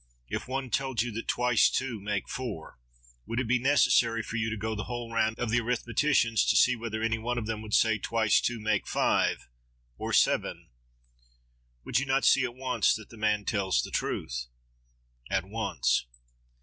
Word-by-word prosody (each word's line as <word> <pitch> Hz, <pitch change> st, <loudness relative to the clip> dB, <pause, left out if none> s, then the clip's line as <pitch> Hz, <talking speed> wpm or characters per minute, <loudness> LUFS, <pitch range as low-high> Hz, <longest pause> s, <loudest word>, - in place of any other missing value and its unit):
If -, -, -4 dB
one 130 Hz, -1 st, -4 dB
told 130 Hz, -2 st, 0 dB
you 120 Hz, -, -4 dB
that 115 Hz, +2 st, -6 dB
twice 125 Hz, -2 st, +3 dB
two 125 Hz, -4 st, -2 dB
make 100 Hz, 0 st, -3 dB
four, 110 Hz, -, -6 dB, 0.5 s
would 115 Hz, +2 st, -2 dB
it 130 Hz, -, -1 dB
be 125 Hz, +2 st, +2 dB
necessary 120 Hz, -4 st, +3 dB
for -, -, -7 dB
you 110 Hz, -1 st, 0 dB
to 110 Hz, -, -3 dB
go 110 Hz, +1 st, -3 dB
the 105 Hz, -1 st, -4 dB
whole 120 Hz, -1 st, -6 dB
round 110 Hz, 0 st, +1 dB
of 120 Hz, -3 st, -2 dB
the 120 Hz, -, +3 dB
arithmeticians, 120 Hz, +1 st, +1 dB
to -, -, +3 dB
see 125 Hz, -, +5 dB
whether 110 Hz, -1 st, -4 dB
any 115 Hz, 0 st, 0 dB
one 120 Hz, +2 st, -2 dB
of 115 Hz, -, -2 dB
them 110 Hz, -1 st, -3 dB
will 110 Hz, -, -9 dB
say 110 Hz, +1 st, +3 dB
that -, -, -19 dB
twice 110 Hz, -3 st, +2 dB
two 120 Hz, -1 st, -1 dB
make 105 Hz, -2 st, 0 dB
five, -, -, +1 dB, 0.5 s
or -, -, -3 dB
seven? -, -, +1 dB, 1.2 s
Would -, -, +1 dB
you 140 Hz, -, -3 dB
not 135 Hz, +1 st, +2 dB
see 135 Hz, -, +5 dB
at 120 Hz, -1 st, -3 dB
once 130 Hz, -1 st, +1 dB
that 110 Hz, -1 st, -10 dB
the -, -, -11 dB
man 105 Hz, -1 st, 0 dB
tells 95 Hz, -, +1 dB
the -, -, -7 dB
truth? -, -, -3 dB, 0.8 s
—At -, -, 0 dB
once. -, -, -1 dB
115 Hz, 190 wpm, -28 LUFS, 110-125 Hz, 1.2 s, see